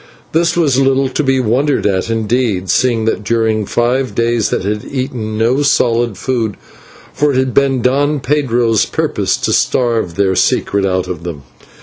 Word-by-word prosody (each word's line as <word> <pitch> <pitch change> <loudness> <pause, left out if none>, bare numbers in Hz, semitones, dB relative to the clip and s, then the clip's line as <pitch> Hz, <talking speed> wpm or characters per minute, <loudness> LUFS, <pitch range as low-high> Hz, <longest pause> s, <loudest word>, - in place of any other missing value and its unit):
This 170 +1 +1
was 145 -6 +2
little 135 0 +2
to 130 - -1
be 135 -2 +1
wondered 130 +5 0
at, 95 +1 0
indeed, 110 -4 0
seeing 120 -3 +1
that 110 -1 -1
during 110 -1 0
five 125 +2 0
days 115 -2 +1
they - - 0
had 105 +3 -3
eaten 125 -5 -4
no 120 +5 +1
solid 120 -6 +1
food, 115 -3 -2 0.6
for 150 +1 +1
it - - 0
had 130 -1 0
been 135 -3 +2
Don 145 +3 +1
Pedro's 125 -5 +1
purpose - - -1
to - - -1
starve 115 -9 0
their 95 0 +1
secret 100 +1 +1
out 95 -1 -1
of 85 -3 -6
them. 80 -5 -7
120 Hz, 165 wpm, -15 LUFS, 110-135 Hz, 0.6 s, was